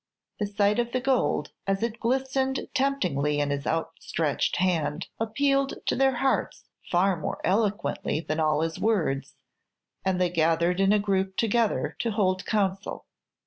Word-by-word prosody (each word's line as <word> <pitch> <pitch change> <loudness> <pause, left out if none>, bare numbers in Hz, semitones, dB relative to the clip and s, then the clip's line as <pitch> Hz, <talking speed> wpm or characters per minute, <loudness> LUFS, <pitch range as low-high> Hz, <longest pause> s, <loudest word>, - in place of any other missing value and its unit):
The 205 - 0
sight 205 +1 +2
of 235 0 -1
the 255 - +2
gold, 260 0 +1 0.2
as 195 +2 0
it 230 0 -2
glistened 265 +2 0
temptingly 180 - +1
in 145 -1 0
his 140 0 -3
outstretched 165 -1 -1
hand, 170 -3 0
appealed 275 +5 +1
to - - +1
their 265 0 +3
hearts 265 +2 0 0.3
far 185 +2 +3
more 160 - -4
eloquently 205 -4 0
than 155 -1 -3
all 155 -1 +2
his 165 0 -2
words, 175 -11 0 0.7
and 190 -1 0
they 180 -1 +2
gathered 170 +2 +2
in 195 0 +4
a 210 - +5
group 195 -2 0
together 230 0 +1
to 235 - 0
hold 185 -3 0
counsel. 195 -2 -1
195 Hz, 150 wpm, -27 LUFS, 165-235 Hz, 0.7 s, a